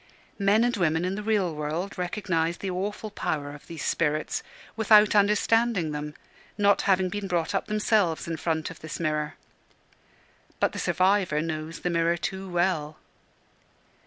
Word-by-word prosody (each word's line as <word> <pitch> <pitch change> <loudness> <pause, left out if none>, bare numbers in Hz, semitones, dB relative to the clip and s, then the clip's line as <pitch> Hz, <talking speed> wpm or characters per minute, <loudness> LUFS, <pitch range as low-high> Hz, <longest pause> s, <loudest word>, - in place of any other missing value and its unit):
Men 200 +3 +4
and 240 0 +1
women 165 -3 +1
in 185 - -1
the 205 - -4
real 205 -5 +1
world 155 +6 -3
recognise 175 -3 -1
the 195 - -4
awful 205 +4 -4
power 145 -7 -3
of 145 - -13
these 165 -3 -6
spirits, 155 -1 0 0.3
without 215 -1 +6
understanding 210 -3 +3
them, 150 0 -5 0.4
not 200 -1 +4
having 190 -1 +4
been 200 +2 -4
brought 175 -2 -1
up 195 - -1
themselves 210 -6 +1
in 165 -1 -3
front 160 -1 -2
of 165 - -12
this 160 - -7
mirror. 150 -2 -1 1.2
But - - +2
the - - -6
survivor 185 -4 +2
knows 160 0 -4
the 180 - -1
mirror 170 0 +2
too 190 +2 -4
well. 175 -4 0
180 Hz, 155 wpm, -26 LUFS, 160-205 Hz, 1.2 s, without